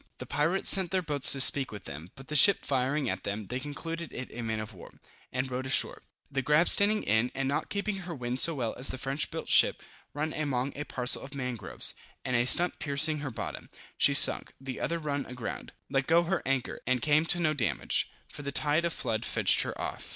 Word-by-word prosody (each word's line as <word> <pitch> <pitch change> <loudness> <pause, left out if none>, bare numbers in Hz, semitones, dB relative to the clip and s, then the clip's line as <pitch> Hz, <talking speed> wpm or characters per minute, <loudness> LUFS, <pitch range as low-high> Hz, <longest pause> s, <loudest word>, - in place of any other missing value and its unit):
The - - -8
pirates 155 +7 0
sent 190 -3 +4
their 185 +1 -1
boats 145 -4 +5
to 135 - -3
speak 135 0 +8
with 105 - -9
them, 80 +5 -10
but 135 -1 -13
the 150 - -5
ship 195 +8 +6
firing 135 +1 -1
at 95 -2 -4
them, 100 +1 -5
they 125 +5 -5
concluded 165 +4 -7
it 130 - -7
a 120 - -6
man 110 -1 -3
of 110 0 -7
war, 90 - -15 0.3
and 130 +1 -3
rowed 130 +1 -4
ashore; 130 - +2 0.3
the 135 0 -1
grab 150 +6 +2
standing 210 +1 +7
in, 110 +4 0
and 135 0 -2
not 140 - -2
keeping 200 0 -3
her 180 -3 -7
wind 125 -1 -4
so 165 +2 +2
well 120 -5 -3
as 130 - -1
the - - -2
French 135 +3 -2
built - - -7
ship, - - +3 0.3
run 155 +2 -3
among 140 -3 -3
a 150 - -6
parcel 125 -2 0
of 135 +1 -10
mangroves, 125 -7 -2 0.3
and 125 -2 -1
a 120 0 +2
stump 175 +6 +1
piercing 145 +2 0
her 145 -1 -5
bottom, 115 - -7 0.3
she - - +3
sunk: - - +5
the 135 -1 -7
other 170 - -2
run 145 -3 -3
aground, 125 -3 -7 0.2
let 135 -1 -2
go 170 +1 +4
her 175 +2 -2
anchor, 135 -1 -2
and 130 -2 0
came 155 +1 +3
to 175 - +2
no 155 -3 +1
damage, 130 -7 -1 0.2
for - - -11
the 140 -1 -5
tide 150 +4 0
of 170 - -2
flood 115 -3 -3
fetched - - +2
her - - -5
off. - - -6
140 Hz, 225 wpm, -28 LUFS, 125-155 Hz, 0.3 s, speak